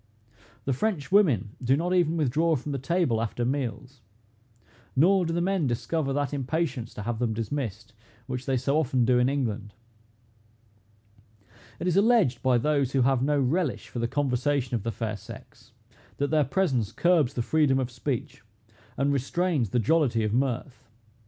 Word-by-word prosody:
The 135 - +1
French 180 - -2
women 145 - +3
do 130 +3 +3
not 175 +3 -1
even 170 -2 +2
withdraw 155 +3 +2
from 145 +2 -4
the 140 - -2
table 135 -5 0
after 115 +1 -2
meals; 125 -1 -3 0.9
nor 180 +5 +4
do - - -2
the 170 +1 0
men 185 -4 +1
discover 130 +5 -1
that 145 0 -1
impatience 135 -3 -2
to 105 - -6
have 115 +1 -3
them 115 -3 0
dismissed, 115 -1 -4 0.3
which 130 0 -5
they 135 -1 +1
so 140 +5 +1
often 130 -5 +1
do 125 0 +3
in 125 +1 +3
England. 110 -7 -3 2.0
It - - -4
is 180 0 +1
alleged 200 - +3
by 130 -2 +3
those 140 0 0
who 135 -2 +3
have 135 -1 +2
no 145 +2 +1
relish 140 +2 -1
for 120 - -5
the 115 - 0
conversation 135 0 0
of 115 - 0
the 115 +3 -3
fair 110 0 -4
sex, - - -13 0.5
that 145 +1 -1
their 155 -2 +3
presence 130 - 0
curbs 170 -3 +2
the 120 - -1
freedom 150 -1 +2
of 130 -2 -2
speech, 120 -2 -4 0.6
and 140 +1 +1
restrains 140 - 0
the 125 - -1
jollity 120 -1 +2
of 105 0 -1
mirth. 130 +1 -2
135 Hz, 170 wpm, -27 LUFS, 120-155 Hz, 2.0 s, nor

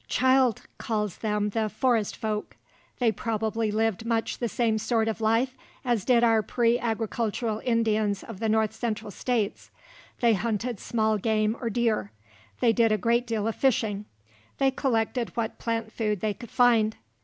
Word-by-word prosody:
Childe 260 -3 +3 0.2
calls 210 -4 -2
them 210 -1 0
the 220 0 0
"Forest 225 -1 +1
folk"; 215 -1 -4 0.4
they 240 -3 +3
probably 220 +1 -1
lived 220 0 0
much 230 -1 -1
the 235 - -1
same 225 -2 +1
sort 225 0 +1
of 225 0 -2
life 230 +4 +2 0.3
as 235 -6 0
did 240 -2 +4
our 225 -2 +4
pre 235 +2 +1
agricultural 225 -1 -2
Indians 220 -4 +1
of 225 -5 -9
the 225 - 0
north 220 0 +2
central 220 -2 -3
states. 225 0 -2 0.5
They 235 -2 +4
hunted 220 +2 -2
small 220 -2 0
game 215 +1 +1
or 235 - -1
deer; 220 - 0 0.5
they 235 -2 +4
did 230 -2 +3
a 215 - +3
great 235 +4 +1
deal 220 -2 -1
of 225 - -1
fishing; 215 -6 +1 0.5
they 270 -1 +3
collected 240 -2 0
what 230 -1 -2
plant 225 -1 -2
food 210 -4 -1
they 215 -1 0
could 235 +2 -11
find. 225 -3 +3
225 Hz, 165 wpm, -27 LUFS, 215-235 Hz, 0.5 s, did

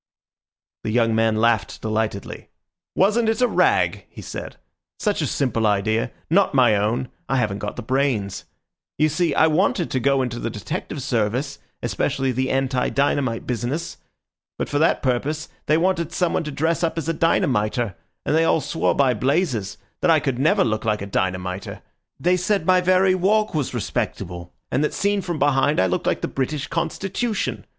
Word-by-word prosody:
The - - -2
young 115 0 +2
man 110 0 +2
laughed 110 -1 +1
delightedly. 110 -2 -3 0.5
"Wasn't 220 +4 +3
it 225 - 0
a 250 - +4
rag?" - - +2
he - - -11
said. - - -7 0.4
"Such 210 -5 0
a 150 - 0
simple 115 -5 0
idea—not 110 - +1
my 120 -5 +5
own. 110 +5 0 0.2
I 135 - +1
haven't 105 -5 0
got 105 - -4
the - - -6
brains. 120 -6 -1 0.5
You 155 - +3
see, 165 +3 0
I - - +5
wanted 170 +2 +1
to 130 - +1
go 135 +1 +2
into 120 -1 -4
the - - -2
detective 140 - -5
service, 125 +3 -1 0.2
especially 135 -1 0
the 130 +2 -1
anti 130 -1 0
dynamite 135 -2 0
business. 125 +7 -3 0.6
But - - -3
for 145 - 0
that 160 - +2
purpose 140 +5 -1 0.2
they 155 - +4
wanted 170 -1 0
someone 175 -2 0
to 150 - -4
dress 160 +5 0
up 165 0 0
as 165 - -3
a 165 - +1
dynamiter; 120 - +1 0.3
and 150 - +1
they 165 - +4
all 165 0 +3
swore 150 +3 0
by 135 -3 +3
blazes 130 - 0 0.2
that 180 - +2
I 160 -2 +6
could 135 -4 -2
never 190 +8 +3
look 110 -1 -1
like 105 -2 0
a - - -4
dynamiter. 95 -1 -3 0.4
They 180 +2 +2
said 185 -1 0
my 185 0 +4
very 185 +1 +4
walk 210 +4 +2
was 145 -5 -2
respectable, 85 -4 -4 0.2
and 140 - +1
that 150 - -1
seen 200 0 +1
from 175 -3 -3
behind 145 +1 +2
I - - +4
looked 90 -1 -1
like - - 0
the - - -1
British 135 +2 -2
Constitution. 195 +6 -2
135 Hz, 175 wpm, -22 LUFS, 115-165 Hz, 0.6 s, I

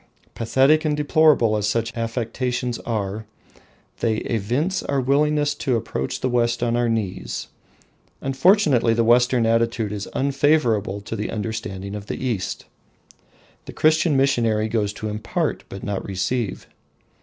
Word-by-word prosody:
Pathetic 135 +7 +3
and 150 -2 0
deplorable 150 -6 +4
as 105 0 0
such 115 +2 -1
affectations 120 +1 -2
are, 105 -1 -3 0.7
they 115 -2 +1
evince 120 - -1
our 140 - -1
willingness 145 +2 +2
to 135 -3 -1
approach 65 - -3
the - - +1
West 120 -1 +1
on 120 0 +1
our 120 -1 +1
knees. 100 - -3 0.7
Unfortunately 135 - +3
the 115 - +2
Western 120 +1 +4
attitude 115 -1 +1
is 105 -1 -5
unfavourable 135 -8 +1
to 105 - -6
the 105 0 -3
understanding 105 -3 -4
of 105 -1 -7
the - - -4
East. 115 -8 -3 1.0
The - - -9
Christian 155 -1 +3
missionary 115 -5 +2
goes 110 -2 0
to 110 - -5
impart, 105 0 -2
but 100 - -8
not 100 -2 -2
to - - -10
receive. 100 +3 -2
115 Hz, 140 wpm, -22 LUFS, 110-135 Hz, 1.0 s, deplorable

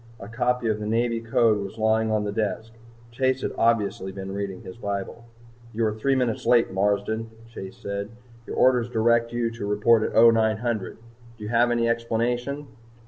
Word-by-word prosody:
A 100 - -9
copy 125 +1 -1
of 110 -1 0
the 105 - -4
Navy 115 +1 0
Code 115 -1 +2
was 100 +2 -6
lying 110 0 +2
on 110 -1 +1
the 105 - -2
desk. 110 +1 -3 0.4
Chase 130 +2 0
had - - -1
obviously 105 -4 +1
been 95 0 -7
reading 100 -2 -5
his 90 - -9
bible. 100 +1 -5 0.5
"You 115 +1 0
are 105 - 0
three 135 +5 0
minutes 125 -4 -1
late, 120 -4 +4
Marsden," 105 +3 0 0.2
Chase 95 -4 -9
said. 100 0 -5 0.4
"Your - - -5
orders 125 -2 +3
direct 115 0 +2
you 120 -1 -1
to 115 -3 -6
report 105 +2 +3
at - - -2
0900. 110 -2 +3 0.4
Do 105 - -10
you 105 - -5
have 120 +1 +3
any 120 -1 +1
explanation?" 120 +4 -1
115 Hz, 180 wpm, -25 LUFS, 105-120 Hz, 0.5 s, late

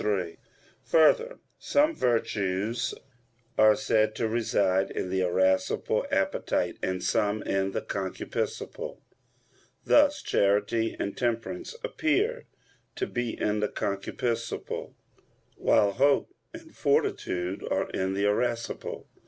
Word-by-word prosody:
3: 95 -5 -1 0.5
Further, 470 - +4 0.2
some 300 +3 +2
virtues 110 -1 0 0.6
are 110 0 +6
said 110 -5 +1
to 115 - 0
reside 100 -4 +1
in 90 - -4
the 95 0 +1
irascible 95 +1 +1
appetite - - 0
and 95 0 -2
some 105 -1 +1
in 95 0 0
the - - -3
concupiscible: 285 - -4 0.9
thus 290 -1 +4
charity 105 +3 +1
and 100 - -2
temperance 125 - -2
appear 425 +10 0 0.5
to 385 - -1
be 120 - -3
in 105 0 0
the 105 - 0
concupiscible, 115 +4 -3 0.6
while 100 - +3
hope 140 +6 +2 0.2
and - - -12
fortitude 90 +1 0
are - - 0
in 95 0 -1
the 100 +1 +1
irascible. 115 +3 -1
110 Hz, 110 wpm, -28 LUFS, 95-125 Hz, 0.9 s, are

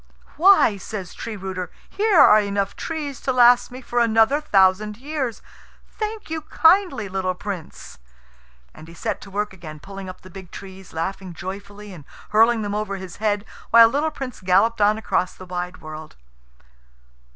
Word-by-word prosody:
"Why," 340 - +5
says 190 -2 -7
Tree 230 -2 -6
rooter, 185 -1 -5 0.2
"here 415 -2 +1
are 215 -5 +8
enough 200 -1 -2
trees 300 -5 -5
to 265 - -1
last 245 -1 +5
me 255 +1 -10
for 240 0 -1
another 230 +5 +3
thousand 205 -3 +2
years. 265 -3 -4 0.4
Thank 435 0 -5
you 320 -1 -2
kindly, 320 - +3
little 185 -1 -2
Prince." 180 - -8 0.7
And 155 - -13
he 165 - -13
set - - -3
to 200 - -11
work 205 +1 -3
again, 155 -5 -10
pulling 195 +3 -9
up 185 - -11
the 185 - -14
big 190 -1 -11
trees, 190 0 -11
laughing 185 +2 -5
joyfully 200 +3 -8
and 155 -6 -12 0.2
hurling 225 +1 +4
them 205 0 -3
over 210 -1 -2
his 185 -2 -9
head, 205 -1 -1 0.2
while 230 0 +8
little 290 +6 0
Prince 270 -5 -7
Ivan - - -17
galloped 210 +5 +3
on 210 +1 +4
across 185 -4 -1
the 185 - -11
wide 180 0 -5
world. 155 0 -9
205 Hz, 170 wpm, -22 LUFS, 185-240 Hz, 0.7 s, are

